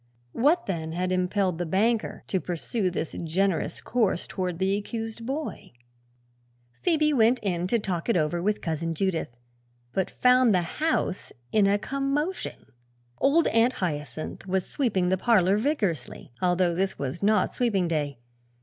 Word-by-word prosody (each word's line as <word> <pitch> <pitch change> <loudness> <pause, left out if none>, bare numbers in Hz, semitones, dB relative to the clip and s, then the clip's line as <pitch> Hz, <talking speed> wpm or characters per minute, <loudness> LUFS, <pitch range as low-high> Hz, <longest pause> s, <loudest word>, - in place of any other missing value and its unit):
What, 305 - +2
then, 160 -4 -3
had 180 +2 -1
impelled 185 -1 0
the 175 - -1
banker 220 +6 0
to 190 - 0
pursue 185 +4 -2
this 170 -2 -3
generous 180 +2 0
course 220 -7 0
toward 180 -2 -3
the 190 +2 +1
accused 225 +2 -5
boy? 290 - -5 1.1
Phoebe 310 -3 +2
went 240 -1 +4
in 180 -3 -1
to 235 - +2
talk 190 -3 -3
it 230 - +3
over 170 +2 0
with 210 +3 0
Cousin 165 0 -2
Judith, 165 -9 -2 0.6
but 190 - 0
found 250 -4 +4
the 180 - +2 0.2
house 315 - 0 0.2
in 210 -2 +4
a 200 +1 +3
commotion. 275 - -2 0.5
Old 300 +5 +4
Aunt 230 +3 +3
Hyacinth 155 0 -4
was 190 0 0
sweeping 195 -10 0
the 190 0 +1
parlor 200 -5 +4
vigorously, 210 - -2
although 180 -1 +2
this 190 +2 -1
was 140 +4 -4
not 210 -1 +2
sweeping 205 -8 +1
day. 145 -5 -1
195 Hz, 150 wpm, -26 LUFS, 175-235 Hz, 1.1 s, went